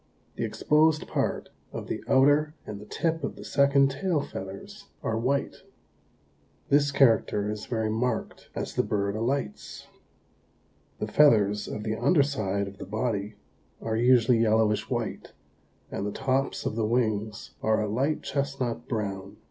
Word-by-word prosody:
The - - -3
exposed 155 +1 +2
part - - -2 0.2
of - - -6
the - - -4
outer 145 +3 +4
and 100 -1 -7
the 105 - -12
tip 165 +5 -1
of - - -3
the - - -10
second 140 -1 +4
tail 170 +3 0
feathers 170 - -8 0.2
are 110 - -1
white. 130 +5 -1 1.1
This 145 0 +4
character 115 -6 +3
is 105 0 -6
very 110 -2 -1
marked 120 +3 -2
as - - -4
the - - +2
bird 100 0 -1
alights. 115 -1 -3 1.1
The - - -2
feathers 105 -8 +4
of 105 - -5
the 110 0 -1
underside 120 - +1
of 100 -1 -11
the - - -6
body 105 -1 -2 0.4
are 110 -1 -2
usually 120 0 +4
yellowish 110 -2 +2
white 120 -4 -3 0.6
and - - -3
the 105 - -2
tops 135 +3 -1
of - - -2
the 110 -1 0
wings 110 -3 -1
are 110 0 +2
a 105 - 0
light 135 +9 0
chestnut 135 -4 -2
brown. 100 -3 -4
115 Hz, 150 wpm, -27 LUFS, 105-140 Hz, 1.1 s, outer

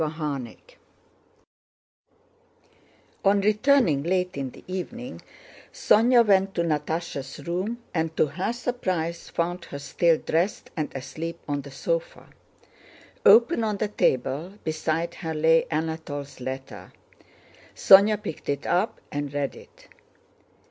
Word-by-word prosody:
CHAPTER 150 -5 -3
XV - - -20 2.5
On 200 +1 +4
returning 210 - +3
late 180 +3 0
in 135 -2 -3
the - - -15
evening 240 +8 -6 0.5
Sónya 240 - +4
went 195 -1 +3
to 170 - +1
Natásha's 150 -3 -3
room, 200 +8 -3
and 160 -1 -2
to - - +4
her 170 +9 -2
surprise 185 -9 -3
found 175 +1 -2
her 140 - -7
still 165 +3 +2
dressed 170 +7 -1
and 155 -4 -2
asleep 165 +5 -6
on 145 -1 -1
the 140 - -11
sofa. - - -3 1.0
Open 235 +6 +6
on 210 -2 -1
the 210 +1 -1
table, 145 +1 0
beside 160 +2 -1
her 160 -3 -5
lay 160 +1 +4
Anatole's 155 -3 -4
letter. 130 +1 -7 0.8
Sónya 200 +2 +7
picked 160 - -6
it 140 +1 -2
up 190 +5 0
and 145 -1 -3
read 145 -1 -2
it. - - -16
170 Hz, 120 wpm, -25 LUFS, 150-205 Hz, 2.5 s, Sónya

